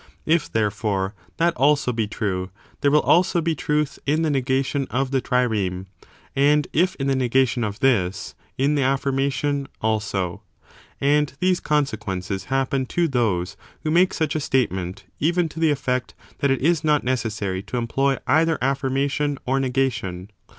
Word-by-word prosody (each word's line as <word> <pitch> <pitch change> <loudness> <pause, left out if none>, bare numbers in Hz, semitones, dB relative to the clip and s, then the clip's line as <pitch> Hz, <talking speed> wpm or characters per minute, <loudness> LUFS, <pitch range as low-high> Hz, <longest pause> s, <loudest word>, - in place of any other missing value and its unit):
If, 160 -1 +1
therefore, 105 -2 -1 0.2
that 170 0 +2
also 140 0 +3
be 110 -2 -1
true, 95 -4 -2 0.3
there 140 - +3
will 150 +1 +4
also 175 +1 +3
be 165 0 0
truth 150 0 -1
in 155 +3 +2
the 155 - +1
negation 135 +1 0
of 135 +1 -1
the 135 -2 +1
trireme; 105 -8 0 0.5
and 145 +2 +3
if 180 +4 +2
in 135 - -3
the 135 -1 +2
negation 130 -1 +2
of 105 0 -4
this, 100 -8 +1 0.2
in 140 +3 +2
the 145 - +1
affirmation 135 +1 0
also. 105 -5 -1 0.6
And 145 +1 +2
these 185 -1 +2
consequences 100 -10 -2
happen 135 0 0
to 170 +4 +1
those 100 - 0 0.3
who 155 - -1
make 180 +3 +3
such 155 -2 -1
a - - +1
statement, 95 -10 -1 0.2
even 170 +3 +2
to 160 - -9
the 165 -1 +3
effect 130 -3 -1 0.2
that 140 - +2
it 135 - +1
is 165 +2 +2
not 150 -1 +2
necessary 110 -7 -2
to 105 +5 -5
employ 135 +3 +1
either 160 +4 +3
affirmation 135 +2 0
or 135 +2 +1
negation. 120 -8 -1
135 Hz, 155 wpm, -23 LUFS, 110-150 Hz, 0.6 s, will